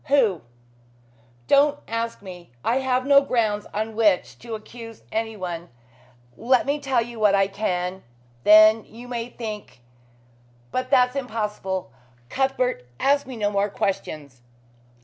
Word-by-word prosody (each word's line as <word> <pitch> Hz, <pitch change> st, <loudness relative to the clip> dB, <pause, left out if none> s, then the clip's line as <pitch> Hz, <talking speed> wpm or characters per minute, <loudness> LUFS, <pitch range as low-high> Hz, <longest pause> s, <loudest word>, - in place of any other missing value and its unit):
"Who?" 235 Hz, -, +3 dB, 1.0 s
"Don't 285 Hz, -, +4 dB
ask 230 Hz, -2 st, -3 dB
me. 180 Hz, -3 st, -10 dB, 0.2 s
I 235 Hz, -, +2 dB
have 260 Hz, -1 st, 0 dB
no 280 Hz, 0 st, +7 dB
grounds 220 Hz, -6 st, 0 dB
on 220 Hz, +1 st, -3 dB
which 210 Hz, -5 st, +2 dB
to 230 Hz, -1 st, -6 dB
accuse 225 Hz, +1 st, -11 dB
anyone. 185 Hz, -7 st, -4 dB, 0.7 s
Let 255 Hz, +1 st, +2 dB
me 285 Hz, +2 st, 0 dB
tell 260 Hz, -4 st, +1 dB
you 235 Hz, -1 st, -9 dB
what 210 Hz, -2 st, +4 dB
I 195 Hz, 0 st, +4 dB
can. 190 Hz, -2 st, -3 dB, 0.4 s
Then 215 Hz, +1 st, +7 dB
you 240 Hz, +2 st, -12 dB
may 240 Hz, -1 st, -4 dB
think 215 Hz, -, -7 dB, 0.9 s
but 255 Hz, 0 st, -2 dB
that's 250 Hz, -1 st, +4 dB
impossible. 210 Hz, -, -3 dB, 0.4 s
Cuthbert, 255 Hz, -, -1 dB
ask 280 Hz, 0 st, +2 dB
me 260 Hz, -, -7 dB
no 205 Hz, -2 st, 0 dB
more 200 Hz, 0 st, +1 dB
questions." 150 Hz, -10 st, -4 dB
225 Hz, 130 wpm, -24 LUFS, 200-250 Hz, 1.0 s, no